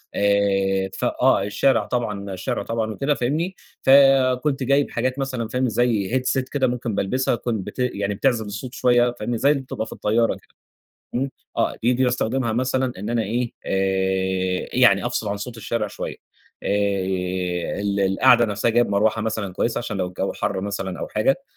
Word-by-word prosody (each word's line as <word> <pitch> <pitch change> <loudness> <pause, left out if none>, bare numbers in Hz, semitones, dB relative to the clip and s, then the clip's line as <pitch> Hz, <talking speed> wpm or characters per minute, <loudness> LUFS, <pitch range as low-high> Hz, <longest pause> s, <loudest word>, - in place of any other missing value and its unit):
آآ 95 -1 +2
ف - - -3
آه 95 - +3
الشارع 130 +6 +2
طبعًا 105 -5 -3
الشارع 110 +7 -3
طبعًا 115 -1 -2
وكده 140 +6 0
فاهمني. 155 +9 -1 0.3
فكُنت 135 0 +4
جايب 140 +2 +2
حاجات 130 +3 -1
مثلًا 130 -4 -2
فاهم، 125 +2 0
زي 110 -3 +1
Headset 130 +1 0
كده 135 -3 +1
ممكن 120 -3 -2
بالبسها 125 +7 0
كن 115 -4 -2
بت 95 - -9
يعني 100 -5 -1
بتعزل 120 0 +1
الصوت 105 +5 -6
شوية 120 0 +3
فاهمني. 120 -1 -2
زي 140 +5 +4
اللي 140 -2 0
بتبقى 120 -3 -4
في - - -8
الطيارة 115 +2 +1
كده. - - -21 0.6
إمم، 135 +2 -1 0.3
آه، - - +1
دي 120 +2 +3
دي 130 +1 +2
باستخدمها 125 -1 0
مثلًا 130 +1 0
إن 105 +3 -4
أنا 120 -1 +1
إيه 120 +3 -2
آآ 95 -1 0
يعني 120 -3 +4
أفصل 120 -3 -2
عن 100 - -2
صوت 115 +3 -7
الشارع 110 0 -2
شوية، - - -6 0.5
آآ - - -3 1.1
ال 100 0 -1
القعدة 100 +5 +5
نفسها 105 +1 0
جايب 120 +1 +3
مروحة 105 +2 +2
مثلًا 110 -3 -3
كويسة، 115 +5 -1
عشان 115 -3 -4
لو 90 - -1
الجو 90 - -3
حر 95 - -2
مثلًا 95 -2 -4
أو - - -4
حاجة 135 +11 +1
115 Hz, 175 wpm, -22 LUFS, 100-125 Hz, 1.1 s, القعدة